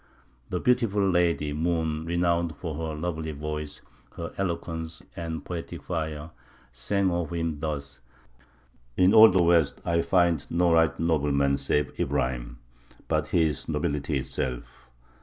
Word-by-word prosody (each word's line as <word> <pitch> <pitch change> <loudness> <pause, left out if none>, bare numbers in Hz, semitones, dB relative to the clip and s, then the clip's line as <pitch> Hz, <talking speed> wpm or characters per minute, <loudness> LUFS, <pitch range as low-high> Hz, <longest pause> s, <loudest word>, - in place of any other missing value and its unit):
The 90 - -1
beautiful 115 -5 +2
lady 85 -5 +1
"Moon," 80 0 -1
renowned 85 -1 +1
for 80 -3 -5
her 80 0 -4
lovely 80 -1 -3
voice, 75 0 -5 0.3
her - - -6
eloquence, 85 -3 -4
and 80 -1 -5
poetic 85 -2 -6
fire, 80 -2 -4 0.4
sang 95 +11 0
of 85 -1 -2
him 80 -3 -2
thus: 70 -3 -4 1.0
"In 90 +2 +5
all 110 0 +10
the 90 -1 +3
west 85 -4 +3
I 85 0 +2
find 85 -4 +2
no 85 0 +2
right 80 -2 +3
noble 80 -3 +1
man 70 0 +2
save 75 - -1
Ibrahim, - - -1 0.5
but 80 -1 0
he 85 0 +2
is 75 -3 -2
nobility 70 0 -1
itself. 65 -1 -5
80 Hz, 140 wpm, -27 LUFS, 75-85 Hz, 1.0 s, all